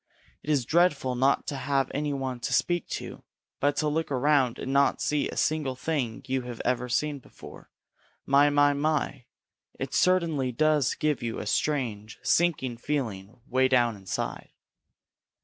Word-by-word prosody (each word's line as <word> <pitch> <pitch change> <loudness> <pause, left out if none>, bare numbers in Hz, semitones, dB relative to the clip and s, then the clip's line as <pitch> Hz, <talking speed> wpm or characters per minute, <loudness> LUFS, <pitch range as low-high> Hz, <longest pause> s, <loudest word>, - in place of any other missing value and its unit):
It - - -9
is 140 -5 +2
dreadful 150 -5 +2
not 135 +3 +2
to 145 - -4
have 135 0 0
any 145 +1 -1
one 130 -3 -3
to 125 +2 -3
speak 170 +8 +1
to, - - -6 0.4
but 145 0 +2
to 155 - 0
look 160 +2 -1
around 135 -2 +2
and 135 - -4
not 140 0 +3
see 150 -1 0
a - - -7
single 150 -4 0
thing 130 -5 -3
you 130 -1 -1
have 120 -2 -8
ever 125 0 0
seen 145 +4 0
before, - - -14 0.6
my, 140 +1 +5
my, 145 0 +4
my, 145 -3 -1 0.5
it - - -4
certainly 165 -8 +2
does 150 +1 +2
give 150 -4 0
you 115 -1 -3
a - - -5
strange, 115 -8 -1
sinking 145 -8 +1
feeling 115 -6 -4
way 130 0 +3
down 120 -3 +2
inside! 95 -2 -5
135 Hz, 160 wpm, -27 LUFS, 125-150 Hz, 0.6 s, my